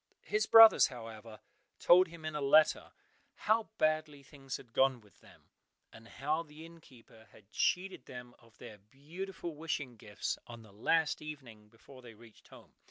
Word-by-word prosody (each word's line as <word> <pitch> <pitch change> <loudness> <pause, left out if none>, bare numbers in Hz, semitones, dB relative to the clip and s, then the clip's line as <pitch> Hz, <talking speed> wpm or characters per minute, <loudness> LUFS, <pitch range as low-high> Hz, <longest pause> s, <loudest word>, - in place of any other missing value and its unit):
His 215 0 -1
brothers, 225 -1 +8
however, 115 -3 -11 0.4
told 180 +2 +5
him 165 -1 -13
in 155 - -4
a 150 - -4
letter 155 +3 +3 0.4
how 220 +1 0
badly 155 -2 -1
things 135 -1 -8
had 120 -3 -18
gone 130 0 +2
with 105 -3 -25
them, - - -22 0.4
and 115 0 -15
how 150 +7 -3
the 155 0 -13
innkeeper 130 -9 -18
had 105 0 -21
cheated 185 -6 -2
them 125 -1 -11
of 115 -2 -24
their 105 - -12
beautiful 165 - -9
wishing 145 -5 -5
gifts 105 -1 -5
on 120 -1 -11
the 105 -2 -18
last 160 +9 0
evening 130 -9 -11
before 130 +4 -17
they 120 -3 -14
reached 110 0 -19
home. - - -17
135 Hz, 165 wpm, -32 LUFS, 115-160 Hz, 0.4 s, brothers